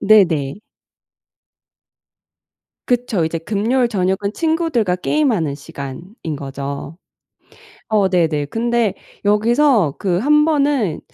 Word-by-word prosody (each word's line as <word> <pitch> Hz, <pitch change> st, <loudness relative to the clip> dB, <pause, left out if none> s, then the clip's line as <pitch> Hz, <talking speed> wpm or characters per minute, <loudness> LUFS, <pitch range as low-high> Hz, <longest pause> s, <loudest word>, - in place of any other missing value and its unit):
네네. 170 Hz, -10 st, +3 dB, 2.3 s
그쵸. 240 Hz, -8 st, +1 dB
이제 165 Hz, +1 st, -2 dB
금요일 225 Hz, +8 st, 0 dB
저녁은 195 Hz, 0 st, 0 dB
친구들과 315 Hz, -, 0 dB
게임하는 185 Hz, -, 0 dB
시간인 145 Hz, -, -7 dB
거죠. 140 Hz, +2 st, -6 dB, 0.9 s
어 205 Hz, -3 st, +2 dB
네네. 160 Hz, -5 st, +1 dB
근데 235 Hz, +1 st, 0 dB, 0.3 s
여기서 215 Hz, -, +3 dB
그 180 Hz, -3 st, 0 dB
1 300 Hz, +6 st, +4 dB
번은 285 Hz, -, +1 dB
200 Hz, 195 characters per minute, -19 LUFS, 160-240 Hz, 2.3 s, 1